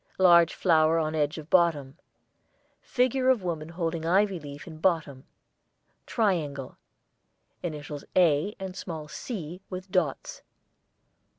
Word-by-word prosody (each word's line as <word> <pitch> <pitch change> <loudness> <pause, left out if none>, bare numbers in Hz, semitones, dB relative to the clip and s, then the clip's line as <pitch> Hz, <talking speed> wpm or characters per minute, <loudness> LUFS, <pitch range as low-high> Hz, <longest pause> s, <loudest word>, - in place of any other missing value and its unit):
Large 170 -3 +6
flower 160 -2 +3
on 155 -1 0
edge 150 +1 0
of 155 0 -10
bottom. 155 -7 +2 0.8
Figure 255 +1 +1
of 250 -7 +3
woman 165 -3 -3
holding 165 -1 -3
ivy 190 +2 +2
leaf 145 -1 -9
in 160 -3 -10
bottom. 155 -6 0 0.8
Triangle. 160 - -1 0.9
Initials 150 -3 -6
'A' 175 +2 +3
and 190 -1 -6
small 160 -5 -6
'C' 180 -1 -6
with 185 0 -7
dots. 165 -7 -1
165 Hz, 115 wpm, -27 LUFS, 150-185 Hz, 0.9 s, Large